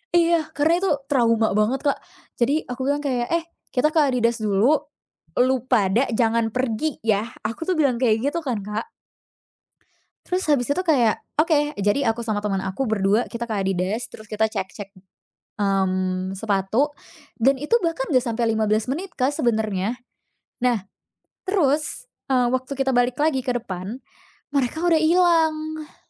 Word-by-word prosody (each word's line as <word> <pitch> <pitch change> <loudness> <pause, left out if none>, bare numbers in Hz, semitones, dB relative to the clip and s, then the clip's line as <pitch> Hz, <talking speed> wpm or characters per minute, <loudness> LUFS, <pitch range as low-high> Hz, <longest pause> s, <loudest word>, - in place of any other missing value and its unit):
Iya, 335 -2 +3
karena 310 +3 +3
itu 390 - +1 0.2
trauma 230 -6 +2
banget, 235 +7 +1
Kak. 285 - +2 0.4
Jadi 280 +6 +1
aku 250 +1 -6
bilang 285 +2 +1
kayak, 245 -3 -1
"Eh 335 0 +1 0.3
kita 300 +4 +1
ke 320 - +4
Adidas 235 -2 +1
dulu, 215 +7 +3 0.6
lu 255 +1 +4
pada 225 +2 +3
jangan 230 -1 +1
pergi 255 +4 -1
ya." 215 +1 +1 0.2
Aku 225 - -3
tuh 365 - +1
bilang 265 -5 +2
kayak 225 -3 +4
gitu 335 +2 -3
kan, 255 -7 -2
Kak. 210 - -4 1.4
Terus 365 +1 -1
habis 260 -5 +3
itu 320 +6 0
kayak, 260 -10 +3 0.2
"Oke." 305 -2 +3
Jadi 205 +8 +1
aku 230 +1 -1
sama 205 -1 -1
temen 200 -2 -1
aku 190 +6 -3
berdua 205 +2 +2
kita 235 0 -4
ke 220 - -3
Adidas, 195 +3 -1
terus 215 - -12
kita 215 +1 0
cek-cek, 195 0 -5 0.7
mmm 185 -1 0
sepatu 210 +6 +1 0.5
dan 270 +3 +4
itu 300 +11 +2
bahkan 330 -5 0
enggak 255 0 +3
sampai 230 -1 0
15 220 +1 +1
menit, 350 +7 -3
Kak, 255 0 +1
ke 290 - -3
sebenernya. 220 - 0 0.7
Nah, 240 -6 +1 0.6
terus, 315 - 0 0.2
eee, 250 -2 +2
waktu 260 +2 -2
kita 270 0 0
balik 245 0 +2
lagi 300 -3 +2
ke 250 - 0
depan, 210 +1 -5 0.5
mereka 285 +5 0
udah 325 -2 +4
ilang. 315 -2 +2
245 Hz, 155 wpm, -23 LUFS, 215-290 Hz, 1.4 s, ke